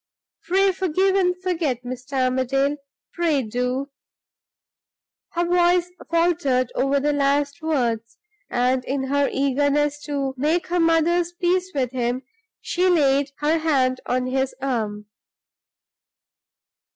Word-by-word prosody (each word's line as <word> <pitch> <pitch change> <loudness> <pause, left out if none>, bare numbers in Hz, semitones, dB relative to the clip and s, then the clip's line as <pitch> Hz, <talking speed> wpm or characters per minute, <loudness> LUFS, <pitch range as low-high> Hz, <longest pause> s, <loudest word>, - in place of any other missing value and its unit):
Pray 385 +3 +3
forgive 375 +1 +1
and 360 -2 +1
forget, 320 -9 -1
Mr. 255 +2 -3
Armadale 270 +3 0 0.4
pray 320 -6 +1
do!" 250 +5 -2 1.4
her 345 0 0
voice 350 0 +2 0.2
faltered 330 -7 +1
over 275 +1 +1
the 295 +1 +1
last 285 +1 0
words, 235 -8 -1 0.3
and, 250 +1 +1
in 270 0 -2
her 285 0 +2
eagerness 285 +2 +1
to 280 -3 -2
make 310 +6 +1
her 355 0 +1
mother's 335 +1 +2
peace 365 +1 0
with 255 -3 0
him, 250 0 -2 0.4
she 365 +1 +1
laid 280 -4 +3
her 310 +2 +2
hand 265 -5 +1
on 250 0 0
his 265 +1 -1
arm. 220 -6 -2
285 Hz, 115 wpm, -23 LUFS, 255-340 Hz, 1.4 s, Pray